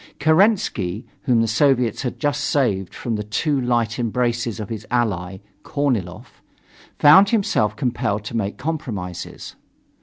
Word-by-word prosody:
Kerensky, 155 - +2 0.2
whom 120 -5 +3
the 115 - +1
Soviets 125 -1 +2
had 125 -2 -4
just 145 -1 0
saved 105 -12 0
from 115 -3 -3
the 105 - -3
too 140 +7 -1
light 120 -2 0
embraces 120 -1 -1
of 105 - -6
his 110 -1 -6
ally, 100 -7 -1 0.2
Korniloff, 120 - -3 0.6
found 160 +7 +7
himself 195 - +1
compelled 105 -3 -1
to 110 - -6
make 105 -3 -2
compromises. 120 - -5
120 Hz, 130 wpm, -21 LUFS, 105-140 Hz, 0.6 s, found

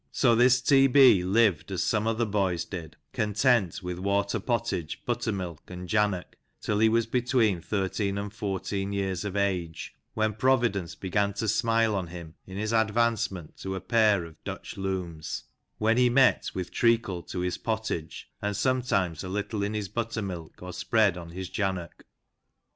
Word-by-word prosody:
" - - -44
So 120 -3 +6
this 125 +2 +5
T. 135 0 +6
B. 130 -8 +6
lived 100 -2 +2
as 90 -3 0
some 110 0 +1
other 115 +1 +1
boys 95 -5 0
did, 85 -5 -7 0.2
content 105 -3 +1
with 90 0 -4
water 100 +3 0
pottage, 115 -8 -2
buttermilk, 100 -9 -3
and 90 0 -7
jannock, 105 -1 0 0.2
till 105 -1 -1
he 110 0 +5
was 115 0 +2
between 115 -5 +1
13 100 +1 -1
and 100 0 -4
14 100 -1 -3
years 95 -2 -1
of 105 -1 -4
age, 90 -5 -2 0.2
when 110 0 +1
Providence 110 -6 +1
began 100 +2 0
to 105 +3 -3
smile 115 0 +2
on 95 -3 -2
him 85 -2 -9
in 95 0 -7
his 110 +2 -2
advancement 110 -6 0
to 95 0 -4
a - - -3
pair 105 -6 +3
of 80 -1 -15
Dutch - - -6
looms,^ 90 -5 -4 0.3
when 110 +2 +2
he 125 0 +5
met 130 +1 +4
with 90 -1 -4
treacle 115 -6 +2
to 90 +1 -5
his 90 -1 -2
pottage, 110 -8 -3
and 105 -1 -2
sometimes 100 - 0
a 95 - -5
little 105 +2 -2
in 105 +2 -1
his 105 -2 -2
buttermilk, 100 -8 -5
or 90 0 -7
spread 105 -1 +2
on 85 -1 -8
his 95 +2 -6
jannock. 95 -3 -3
100 Hz, 170 wpm, -27 LUFS, 90-115 Hz, 0.3 s, So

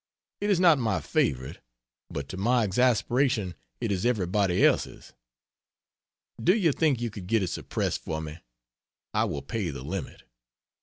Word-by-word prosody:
It 205 - -1
is 195 -4 +3
not 170 -6 +6
my 110 -6 0
favorite, 65 0 -1 0.5
but 70 -1 -5
to - - -5
my 120 +5 +2
exasperation 120 -1 +2 0.3
it 115 - -1
is 95 -2 -1
everybody 100 -5 +2
else's. - - 0 1.3
Do 180 +4 +5
you 175 -8 +3
think 145 -3 +1
you 120 -1 -2
could 100 -4 -8
get 110 0 +2
it 90 - -1
suppressed - - -2
for 80 - -3
me? 80 +1 -7 0.7
I - - +2
will 70 -1 -4
pay 95 +5 -3
the 70 -4 -6
limit. 90 +5 -5
105 Hz, 155 wpm, -27 LUFS, 90-125 Hz, 1.3 s, not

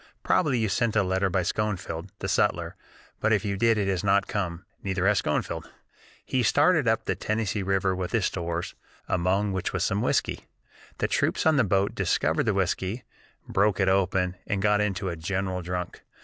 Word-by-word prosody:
Probably 150 -8 +2
you 110 -1 +1
sent 115 +2 0
a 105 - +4
letter 95 +1 +1
by 90 0 +1
Schoenfield 95 -3 -2
[the - - -4
sutler], - - +1 0.4
but 110 - +1
if 105 -1 +2
you 100 -1 -1
did 115 +2 +3
it 100 -2 0
has 95 -1 0
not 100 0 +3
come, 90 -4 -3 0.2
neither 95 -1 -1
has 105 0 +3
Schoenfield. - - -2 0.6
He 130 - 0
started 145 - +3
up 110 -1 +1
the - - +1
Tennessee 110 +2 -2
River 95 0 +1
with 90 -1 -4
his 110 -5 +1
stores, 85 -1 -3 0.3
among 95 +3 +1
which 95 -1 -2
was - - 0
some - - 0
whiskey. - - 0 0.5
The - - 0
troops - - 0
on 160 -2 +4
the 130 - +5
boat 100 0 +1
discovered - - +1
the - - +2
whiskey, 100 +7 -1 0.4
broke 100 +1 +2
it 95 -1 +3
open, 95 -1 +1
and 100 - -1
got 105 +1 +3
into 100 -2 -1
a 85 - -3
general 95 +2 -2
drunk. 90 0 -5
95 Hz, 190 wpm, -26 LUFS, 95-105 Hz, 0.6 s, the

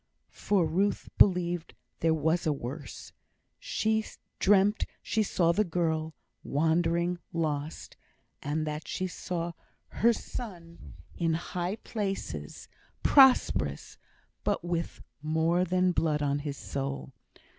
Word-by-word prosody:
For 195 -5 +1
Ruth 190 +6 0
believed 175 -3 +3 0.2
there 165 - +3
was 160 +2 +1
a - - +3
worse. 140 +1 -6 0.5
She 220 0 0 0.4
dreamt 205 +1 +4 0.2
she 220 - +1
saw 175 -5 +2
the 205 +5 +2
girl, 160 -3 -1 0.3
wandering, 170 +3 +1
lost; 155 -3 -3 0.4
and 155 +2 -1
that 150 0 -4
she 185 - -2
saw 175 -1 -3 0.4
her 235 +3 +3
son 175 -8 -7 0.2
in 165 -2 0
high 175 +3 -3
places, 205 -3 -5 0.4
prosperous 265 -2 +4 0.4
but 200 -4 0
with 170 -1 -3 0.2
more 160 +3 +2
than 185 0 +2
blood 155 -3 +1
on 140 0 +1
his 145 -1 -5
soul. 135 0 -4
170 Hz, 115 wpm, -29 LUFS, 155-185 Hz, 0.5 s, dreamt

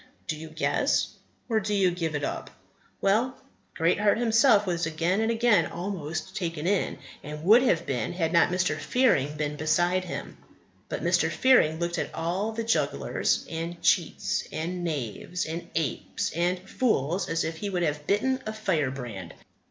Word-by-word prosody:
Do 155 - -2
you 160 +1 -9
guess, 155 +1 +1 0.4
or 225 -2 +2
do 210 0 -1
you 190 -3 +3
give 165 -3 -2
it 145 - -2
up? - - -3 0.5
Well, 225 +6 +2 0.4
Greatheart 200 +6 +3
himself 225 -2 +4
was 170 -3 -1
again 170 +6 0
and 225 - +1
again 230 -6 +3
almost 175 -1 -5
taken 165 -3 -3
in; 195 +1 +1 0.3
and 150 +1 -7
would 220 +7 +7
have 170 -10 +2
been 125 -1 -2
had 165 -2 -1
not 170 - +5
Mr. 180 +1 +1
Fearing 150 - +2
been 150 0 -2
beside 175 +4 +1
him. 175 - -6 0.5
But - - -4
Mr. - - +3
Fearing 250 -12 +4
looked 170 0 -2
at - - -4
all 180 +6 -1
the 230 +1 -3
jugglers, 225 0 0
and 165 +1 -5
cheats, 170 -4 +1
and 175 +3 -3
knaves, 155 - -3
and 165 +2 -5
apes, 160 -3 -2
and 175 +2 0
fools 185 - 0
as 165 0 0
if 160 0 -3
he 200 +5 -3
would 180 -3 -1
have 150 -2 -2
bitten 260 +6 +1
a 215 - -2
firebrand. 135 - -2
175 Hz, 165 wpm, -27 LUFS, 155-205 Hz, 0.5 s, would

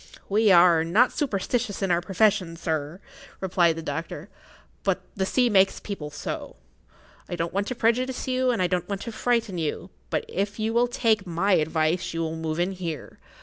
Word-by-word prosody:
"We 210 +1 +3
are 170 -2 +6
not 210 +10 +3
superstitious 225 -4 -1
in 190 - +1
our 170 0 +2
profession, 190 -2 +1
sir," 160 0 -3 0.4
replied 175 -3 +2
the 165 - -6
doctor. 165 +3 -5 0.5
"But - - 0
the 190 -2 -1
sea 250 +3 +3
makes 195 -4 +3
people 180 -8 -6
so. 145 - -6 0.7
I - - -3
don't 170 0 -3
want 200 +1 -1
to 255 - -3
prejudice 250 +4 0
you, 255 0 +1
and 230 -6 +1
I - - +3
don't 180 0 -1
want 200 -1 -3
to 230 - -5
frighten 225 -4 0
you, 165 +3 -3 0.2
but - - -1
if 200 +2 -2
you 220 +1 -1
will 240 +1 +3
take 225 -5 +1
my 175 +4 0
advice 160 +1 +1
you 165 - -1
will 160 0 -2
move 160 0 -3
in 180 +2 +1
here. 170 -6 -6
190 Hz, 190 wpm, -25 LUFS, 165-220 Hz, 0.7 s, are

